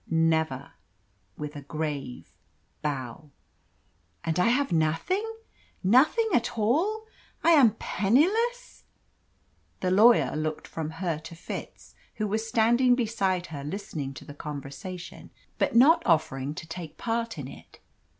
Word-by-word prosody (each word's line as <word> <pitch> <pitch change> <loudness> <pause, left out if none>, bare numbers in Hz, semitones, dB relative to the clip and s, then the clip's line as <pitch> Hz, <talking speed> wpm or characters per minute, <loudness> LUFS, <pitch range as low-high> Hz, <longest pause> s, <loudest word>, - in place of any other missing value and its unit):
"Never" 160 -4 +1 0.7
with 150 0 -6
a 145 - -6
grave 145 -3 -5 0.5
bow. 140 0 -4 0.9
"And 165 0 -1
I 180 - +4
have 260 0 +2
nothing 165 - +1 0.6
nothing 275 - +4
at 235 -3 +1
all! 340 - +1 0.4
I 335 - +5
am 265 -10 +6
penniless?" 435 - +1 1.0
The 185 - 0
lawyer 220 +2 +5
looked 155 0 -3
from 160 -2 -4 0.2
her 165 -3 0
to 160 +2 -10
Fitz, 165 - -8 0.2
who 215 - -1
was 220 +2 -2
standing 240 +3 +4
beside 195 -7 0
her 140 -2 -5
listening 150 -5 -5
to - - -10
the 145 - -9
conversation, 150 +5 -8 0.3
but - - +1
not 285 +8 +7
offering 145 -4 +1
to 160 - -7
take 165 -1 -8
part 230 0 -2
in - - -5
it. - - -14
180 Hz, 130 wpm, -27 LUFS, 155-235 Hz, 1.0 s, not